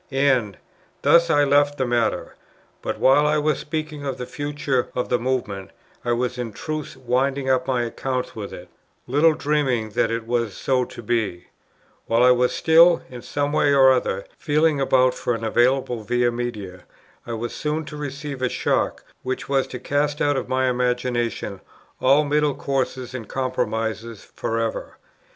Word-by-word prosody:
And 130 -7 +1 0.5
thus 170 0 +5
I 145 -2 +4
left 145 +1 +3
the 130 - 0
matter. 120 -2 0 0.5
But, - - -3
while 145 +3 +5
I 150 +1 +2
was 150 -1 +1
thus - - -7
speaking 155 -1 -4
of 135 -2 -3
the 125 - -5
future 145 -2 -2
of 125 - -2
the 125 - +2
Movement, 115 -6 -2 0.3
I 120 - -1
was 125 +1 -1
in 115 -3 -4
truth 155 +7 -5
winding 130 +2 0
up 130 -1 +1
my 125 -2 +1
accounts 125 +2 -3
with 105 -3 -6
it, - - -9 0.4
little 150 +5 +4
dreaming 135 -8 0
that - - +1
it 115 -1 -3
was 115 -3 -1
so 130 -2 +1
to 120 - -11
be; 105 -6 -2 0.6
while 115 +1 +3
I 125 - +7
was 125 0 +3
still, 165 +1 +5
in 125 -1 -8
some 145 +3 -2
way 145 -2 +3
or 135 -1 +7
other, 110 -6 0
feeling 150 -1 +2
about 130 -1 +3
for 120 - -2
an 115 - -6
available 120 +1 +1
Via 120 +3 +1
Media, 105 -7 -5 0.4
I 120 - -4
was 115 +1 -4
soon 155 +1 -2
to 150 - -8
receive 145 -1 -6
a 130 - +1
shock - - -1 0.2
which 130 0 -4
was 135 -1 +1
to 125 - -6
cast 145 +3 -1
out 145 0 +2
of 130 -1 -3
my 130 0 +1
imagination 125 -4 -1 0.4
all 140 +3 +4
middle 150 -1 +1
courses 130 -3 -2
and 120 -5 -6
compromises 115 -3 -3
for 115 - -4
ever. 115 -1 -3
130 Hz, 175 wpm, -23 LUFS, 120-145 Hz, 0.6 s, I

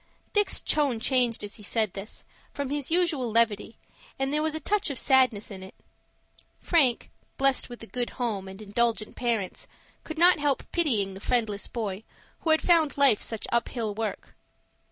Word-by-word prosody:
Dick's 415 -1 +2
tone 285 -6 0
changed 245 -2 +1
as 205 - -6
he - - -14
said 215 -1 -1
this, 200 +2 -8 0.3
from 280 -1 -3
his 290 -2 -3
usual 325 -8 +1
levity, 225 -1 +1 0.4
and 270 +1 -1
there 300 - +1
was 315 0 -1
a - - -2
touch 410 +2 0
of 280 - -4
sadness 250 -5 +3
in 190 -2 -8
it. 190 0 -11 0.8
Frank, 275 -9 +2 0.3
blessed 270 -1 +2
with 240 -1 -10
a - - -6
good 245 +1 -3
home 215 -6 -2
and 190 +3 -9
indulgent 215 +1 -1
parents, 230 -6 -2 0.4
could 315 - -7
not 345 0 +6
help 285 -2 0
pitying 225 - 0
the 190 - -9
friendless 215 -3 -1
boy 210 -4 -4 0.4
who 330 - -3
had 315 0 +4
found 325 -5 +4
life 275 -7 +5
such 225 -2 -2
up 235 0 +1
hill 225 -4 -3
work. 220 +1 -5
240 Hz, 175 wpm, -27 LUFS, 215-290 Hz, 0.8 s, not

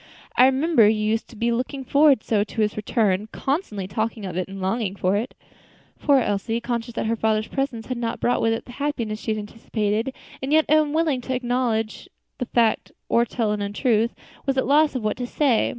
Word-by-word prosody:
"I 250 - +7
remember 265 -4 +4
you 215 0 +1
used 220 +1 0
to 240 - -13
be 235 +2 0
looking 255 +3 -2
forward 280 -2 +4
so 210 -3 +1
to 220 +2 -4
his 210 -1 +1
return; 210 -2 0
constantly 265 - -2
talking 220 +1 -3
of 180 -3 -5
it 185 0 -2
and 195 0 -8
longing 195 +1 -1
for 185 0 +1
it." 225 +5 -2 0.6
Poor 285 -2 +4
Elsie, 225 -1 0
conscious 235 -1 -4
that - - -1
her 225 +1 +1
father's 215 -1 0
presence 265 -5 -2
had 255 -2 -4
not 230 -1 -2
brought 245 - +1
with 225 - +2
it 225 - -4
the - - -11
happiness 230 -8 -2
she - - -6
had 215 - +1
anticipated, 215 +2 -2 0.3
and 265 +2 -3
yet 315 0 +5
unwilling 310 -1 +2
either 245 - -12
to 260 - 0
acknowledge 245 -3 -1 0.3
that 250 - -3
fact 230 -2 +2 0.2
or 235 0 +4
tell 225 -2 -1
an 210 -1 -2
untruth, 220 +3 +1 0.3
was 270 -1 +1
at 260 - +3
a - - -5
loss 295 +1 +4
what 215 -4 -1
to 245 0 -3
say. 255 -4 +2
230 Hz, 215 wpm, -23 LUFS, 215-260 Hz, 0.6 s, I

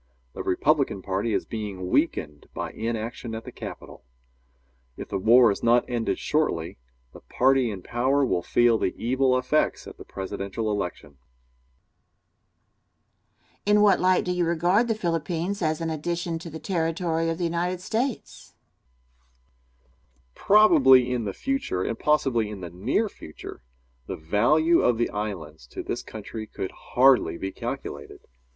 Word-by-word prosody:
The - - -6
Republican 135 -3 +1
party 100 +4 -1
is - - 0
being 100 -5 -5
weakened 75 -1 0
by - - -4
inaction 115 +1 -4
at 110 - -6
the - - -8
Capital. - - -9 0.9
If - - -7
the - - -2
war 115 +3 +6
is 100 - -4
not 120 +1 +3
ended 120 -2 -1
shortly, 85 - -1 0.3
the - - -11
party 130 -1 +2
in 95 -4 -6
power 135 +4 +1
will 90 - 0
feel 120 +2 +3
the - - -1
evil 130 +2 +2
effects 140 +4 0
at - - -11
the - - -8
presidential 100 +3 -4
election. 90 -8 -5 2.4
Question. 210 +1 +3
In - - +4
what 200 -2 +5
light 185 0 +3
do 180 - -1
you 180 -1 0
regard 175 +7 +2
the 225 - 0
Philippines 170 +1 -2
as 155 -1 0
an 165 -1 -2
addition 170 +1 -3
to 165 - -8
the 160 - -7
territory 165 -2 -1
of 165 - -2
the 180 - -3
United 175 +2 -1
States? 230 +7 -4 1.3
Answer. - - -38 0.5
Probably 135 - +5
in 120 -3 -2
the 100 - -2
future, 270 - -2
and 115 - -3
possibly 130 -7 +1
in 105 -3 -8
the 90 -2 -7
near 115 - 0
future, 80 - -11 0.5
the - - -5
value 145 - +3
of 120 -2 +2
the 120 - 0
islands 80 -10 -5
to - - -7
this - - -3
country 110 0 -8
could 95 - -5
hardly 130 -8 +3
be 95 +2 -4
calculated. - - -6
130 Hz, 155 wpm, -25 LUFS, 105-165 Hz, 2.4 s, war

